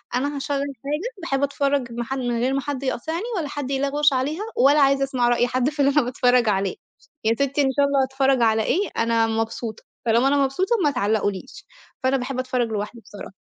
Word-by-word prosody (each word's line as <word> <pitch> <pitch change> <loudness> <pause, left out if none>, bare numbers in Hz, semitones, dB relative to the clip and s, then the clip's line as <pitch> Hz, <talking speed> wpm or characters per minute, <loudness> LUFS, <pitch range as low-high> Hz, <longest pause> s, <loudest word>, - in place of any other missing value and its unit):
أنا 285 +3 -1
هاشغّل 280 0 -2
حاجة 285 - -4
باحب 275 -4 -1
أتفرّج 280 -3 0
ما 240 +1 -3
ح 265 - -5
من 245 -3 -1
غير 255 +3 +1
ما 275 - 0
حد 275 -1 -4
يقاطعني 320 - -2
ولا 310 -4 -2
حد 280 -2 -5
يلغوش 280 +1 +2
عليها 295 +10 -1
ولا 285 +3 +5
عايزة 275 0 +4
أسمع 255 -3 0
رأي 240 0 +2
حد 255 +2 0
في 300 -1 -12
اللي 280 0 +4
أنا 295 +1 +4
باتفرّج 245 -1 +2
عليه، 195 -2 0 0.5
يا 225 +1 +3
سِتّي 280 +3 0
إن 270 -1 +2
شاء 285 - +5
الله 280 -1 +2
هاتفرّج 265 -1 +1
على 220 -1 +3
إيه 400 - 0
أنا 230 0 +2
مبسوطة، 225 0 -3 0.2
طالما 235 +4 +3
أنا 280 0 +3
مبسوطة 370 - 0
ما 290 - +3
تعلقوا 215 -4 +1
ليش، 190 - -10 0.4
فأنا 260 +1 +2
باحب 255 +1 -4
أتفرّج 255 -2 -1
لوحدي 215 +2 -4
بصراحة. 205 -2 -10
265 Hz, 210 wpm, -23 LUFS, 240-280 Hz, 0.5 s, ولا